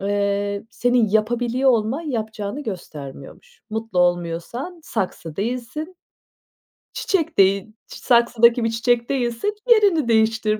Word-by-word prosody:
Eee, 200 +1 -1
senin 245 -2 +2
yapabiliyor 240 +5 +1
olman, 230 +5 0
yapacağını 220 -3 -4
göstermiyormuş. 145 - -9
Mutlu 220 -4 -3
olmuyorsan 175 - -1
saksı 180 - -4
değilsin. 250 - -4 1.0
Çiçek 350 -6 -1
değil, 195 +2 +3
ç - - -12
saksıdaki 235 -1 +3
bir 230 - +1
çiçek 235 +1 0
değilsin 260 - -1
yerini 400 - +4
değiştir, 220 -1 +2
225 Hz, 110 wpm, -22 LUFS, 200-250 Hz, 1.0 s, yerini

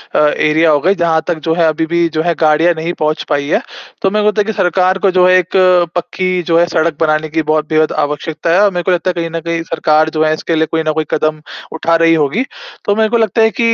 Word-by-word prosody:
अ, - - +3
area 155 +2 +2
हो 145 - +3
गए, 190 +3 +2
जहाँ 165 -2 +1
तक 175 - -1
जो 160 - +2
है 170 -1 +2
अभी 160 +1 -1
भी 170 +1 0
जो 155 - +1
है 170 -1 +1
गाड़ियाँ 160 +2 +3
नहीं 165 +2 -3
पहुँच 155 0 -1
पाई 145 -1 -1
है। - - +1 0.4
तो 195 - +2
मेरे 210 +1 0
को - - +2
लगता 210 0 0
है - - -1
कि 220 - -3
सरकार 185 0 +1
को 195 - +2
जो 180 0 +3
है 185 0 +5
एक 180 +1 -5 0.4
पक्की 185 +1 -2
जो 165 0 +1
है 175 - +4
सड़क 160 -2 -1
बनाने 155 0 0
की 160 +1 -1
बहुत 155 -1 0
बेहद 155 -1 +1
आवश्यकता 155 +3 -3
है 195 - +4
और 205 - +3
मेरे 175 -1 -3
को 185 - 0
लगता 180 +1 0
है 180 - 0
कहीं 165 -1 -3
न - - -1
कहीं 165 0 -2
सरकार 155 -1 +1
जो 155 - +2
है 155 - +2
इसके 165 +1 -3
लिए 160 0 +1
कोई 160 -1 0
न - - +3
कोई 155 0 -2
कदम 155 0 -1 0.3
उठा 165 +1 0
रही 165 0 +3
होगी। 155 - 0 0.4
तो 205 - +1
मेरे 220 0 +1
को 235 - +1
लगता 225 0 +1
है 225 - +4
कि 230 0 +3
165 Hz, 280 wpm, -14 LUFS, 155-180 Hz, 0.4 s, है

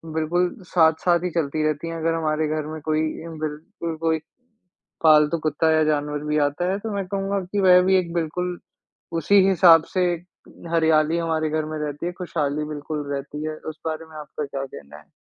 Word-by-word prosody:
बिल्कुल 175 +3 0 0.2
साथ-साथ 170 +1 +3
ही - - 0
चलती 155 -1 0
रहती 155 +2 -2
हैं, 165 - -4
अगर 165 0 0
हमारे 155 -1 0
घर 155 0 -2
में 160 - -6
कोई 155 0 +1 0.2
इन 165 -2 -8
बिल्कुल 160 +3 -5
कोई 160 -1 +1 0.8
पालतू 155 0 +5
कुत्ता 155 +1 +2
या 155 0 +4
जानवर 150 -1 -1
भी 150 0 0
आता 175 +6 -2
है, 195 - -1
तो 220 +1 -5
मैं 200 -1 -2
कहूँगा 195 +1 -1
कि 205 - 0
वह 180 -1 +7
भी 190 +1 +4
एक 170 -2 -2
बिल्कुल 175 +2 -2 0.6
उसी 195 +4 +5
हिसाब 170 -4 +6
से 185 - +2 0.7
हरियाली 160 -1 +3
हमारे 160 -2 -1
घर 155 0 0
में 155 0 -5
रहती 150 +1 -4
है, 175 - -2
खुशहाली 150 -5 -2
बिल्कुल 150 0 -5
रहती 145 +2 -5
है। 155 0 -3
उस 155 0 -7
बारे 160 0 -3
में 155 - -12
आपका 150 0 -6
क्या 135 -1 -4
कहना 75 - -12
है? 75 - -20
160 Hz, 195 wpm, -23 LUFS, 150-175 Hz, 0.8 s, वह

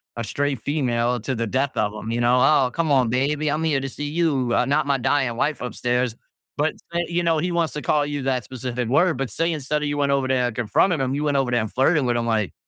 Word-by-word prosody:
a 115 - -3
straight 140 0 -2
female 125 -4 0
to 130 +5 -3
the 115 -1 -2
death 135 +4 -1
of 105 -1 0
him, 110 +1 -6
you 120 - -1
know? 120 +1 +4
"Oh, 135 -1 +4
come 160 +1 -1
on, 130 -4 +3
baby. 145 +5 0
I'm 150 +2 -1
here 150 -4 +1
to 135 - -4
see 145 +3 -6
you, 145 -6 0
uh, - - +2
not 145 +1 +1
my 140 -1 +1
dying 130 -2 +1
wife 150 +3 0
upstairs." 125 0 -1 0.4
But, 150 +2 0 0.2
say, 170 0 0
you 175 0 0
know, 165 -2 +2
he 175 +3 -1
wants 170 -2 0
to 150 - -4
call 150 -1 +1
you 145 -2 -4
that 130 -2 0
specific 125 -2 -4
word. 160 +2 +3
But, 135 -3 -2
say, 165 +6 0
instead 150 0 -2
of 150 - -1
you 145 - -2
went 140 -1 +1
over 135 -1 +1
there 130 -1 +1
and 110 - -5
confronted 130 - +1
him, 130 0 -1
you 145 - -2
went 145 -2 +1
over 135 -2 +1
there 120 -2 +2
and 110 - -4
flirted 140 +1 +2
with 120 - +1
him, 115 - -1
like, 110 -4 0
135 Hz, 270 wpm, -23 LUFS, 125-150 Hz, 0.4 s, know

